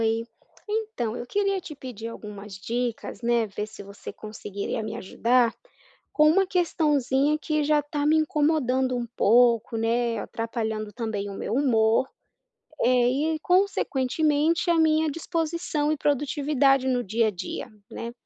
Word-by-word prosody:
Oi. 225 0 +1 0.4
Então, 420 - -2
eu 245 - -6
queria 395 +3 0
te 325 -4 -9
pedir 245 -5 -7
algumas 210 -3 -9
dicas, 235 +5 -3
né. 235 -1 +2
Ver 210 0 -5
se 210 - -11
você 200 +1 -9
conseguiria 210 0 -5
me 215 - -5
ajudar, 235 +4 +2 0.6
com 305 0 +5
uma 385 +4 +3
questãozinha 300 -5 +1
que 305 -1 0
já 300 0 +3
tá 290 0 -3
me 310 +1 +4
incomodando 290 -5 +1
um 240 - -2
pouco, 230 0 +4
né. 230 +1 0
Atrapalhando 220 -1 -4
também 220 -4 -3
o 200 - -7
meu - - -4
humor. 230 -2 +3 0.7
Eh, 255 +5 +2
e 310 - -5
consequentemente 315 -3 +1
a 340 - +3
minha 315 -1 +3
disposição 325 -1 -2
e - - 0
produtividade 280 -1 +2
no 250 -1 +1
dia 225 +4 +1
a - - +1
dia, 180 -4 -6 0.2
né. 235 0 -6
255 Hz, 145 wpm, -25 LUFS, 225-305 Hz, 0.7 s, com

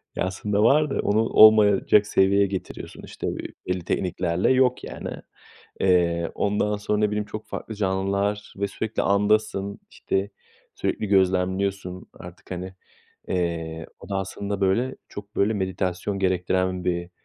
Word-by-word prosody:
ya, - - 0
aslında 100 +2 -1
var 150 +5 +4
da, - - -2
onu 105 +2 +2
olmayacak 105 -2 +6
seviyeye 100 0 +3
getiriyorsun. 95 -1 -6
İşte, - - -6
ö - - -1 0.3
belli 90 -1 -2
tekniklerle 90 +3 0
yok, 130 -1 +3
yani. - - -6 0.7
Eee, 85 -3 +2
ondan 105 +1 0
sonra 105 0 -1
ne 105 - +2
bileyim 105 0 -1
çok 110 +1 -8
farklı 110 - -6
canlılar 100 +1 -1
ve 100 - -1
sürekli 110 +2 -3
andasın, 100 0 +1
işte, 95 +1 -2 0.4
sürekli 105 - -2
gözlemliyorsun 95 -1 0
artık. 90 0 -13
Hani, 90 0 -4
artık, 95 0 -12 0.5
eee, 80 -3 -2
o - - -12
da 100 - -2
aslında 100 +1 -4
böyle, 100 +7 +1
çok 100 +1 -10
böyle 100 +2 +2
meditasyon 95 0 -2
gerektiren 95 -1 0
bir 85 0 -2
100 Hz, 145 wpm, -24 LUFS, 90-105 Hz, 0.7 s, olmayacak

